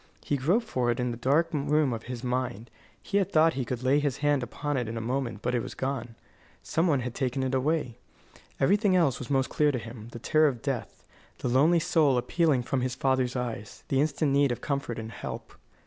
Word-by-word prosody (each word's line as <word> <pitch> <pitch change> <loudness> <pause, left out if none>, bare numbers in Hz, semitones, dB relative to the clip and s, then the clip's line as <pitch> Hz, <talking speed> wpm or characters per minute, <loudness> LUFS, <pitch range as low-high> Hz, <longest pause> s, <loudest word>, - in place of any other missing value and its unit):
He - - +1
groped 175 - +1
for 125 - -1
it 120 - 0
in 125 -1 0
the - - -4
dark 150 +8 +2
room 150 -2 +2
of 115 - -4
his 125 -1 -6
mind. 125 -3 -2 0.3
He 200 - +1
had 195 - -1
thought 160 +1 +4
he 130 - -2
could 125 0 -4
lay 135 +3 +4
his 145 -3 -1
hand 145 -1 +2
upon 145 +4 -3
it 125 -3 -1
in 115 +1 -4
a - - -1
moment, 120 -2 -3
but 125 - 0
it 120 - +1
was - - -7
gone. 125 -4 -3 0.5
Some 165 +3 +1
one 145 -6 +2
had 125 -1 -4
taken 130 +1 -1
it 130 0 -1
away. 130 -3 0 0.6
Everything 200 +6 +3
else 160 -8 +2
was 125 - -7
most 135 -2 +1
clear 150 -1 +3
to 130 - -2
him: 115 -1 -8
the - - -7
terror 155 +6 +3
of 125 -5 -3
death; 135 -3 -4 0.3
the 125 - -2
lonely 145 +8 +4
soul 150 -5 +3
appealing 135 +1 +2
from 130 +1 -1
his 125 0 -2
father's 130 -1 +1
eyes; 115 -4 -5
the 135 0 +2
instant 150 -1 +1
need 140 -1 +3
of 120 - -3
comfort 140 -5 -3
and 110 0 -6
help. - - -7
130 Hz, 225 wpm, -28 LUFS, 120-145 Hz, 0.6 s, thought